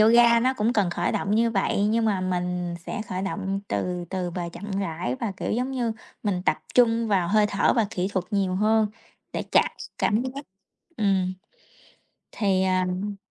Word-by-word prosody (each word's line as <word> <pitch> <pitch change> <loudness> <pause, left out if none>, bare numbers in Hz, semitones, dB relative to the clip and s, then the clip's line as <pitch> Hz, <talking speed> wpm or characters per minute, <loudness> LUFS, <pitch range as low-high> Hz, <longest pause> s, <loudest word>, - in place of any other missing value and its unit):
yoga 235 +1 +6
nó 260 +2 +2
cũng 225 0 +1
cần 205 -7 +2
khởi 175 0 -1
động 200 - 0
như 230 +1 +3
vậy, 200 -1 +1
nhưng 225 +2 +2
mà 205 -4 +1
mình 180 -1 -2
sẽ - - -3
khởi 185 -3 -4
động 195 0 -2
từ 180 -1 -2
từ 185 -2 -2
và 175 0 -4
chậm 205 +4 -8
rãi, 165 -9 -2
và 215 - -1
kiểu - - -2
giống 250 +4 0
như 245 -4 -1 0.3
mình 190 -4 -1
tập - - +2 0.2
trung 230 -2 +4
vào 185 -4 +2
hơi 210 +1 +4
thở 200 -1 +2
và 225 -3 +3
kỹ 185 -2 -1
thuật 185 -2 0
nhiều 195 -3 +1
hơn 215 +2 +3 0.5
để - - -2
chạc - - +5
s - - -8
cảm 215 +3 +2
giác. 265 +3 -5 0.5
Ừm. 190 -3 +1 1.0
Thì 195 -3 +1
à, 185 -1 +2
ừm 200 +3 -3
200 Hz, 195 wpm, -25 LUFS, 185-225 Hz, 1.0 s, yoga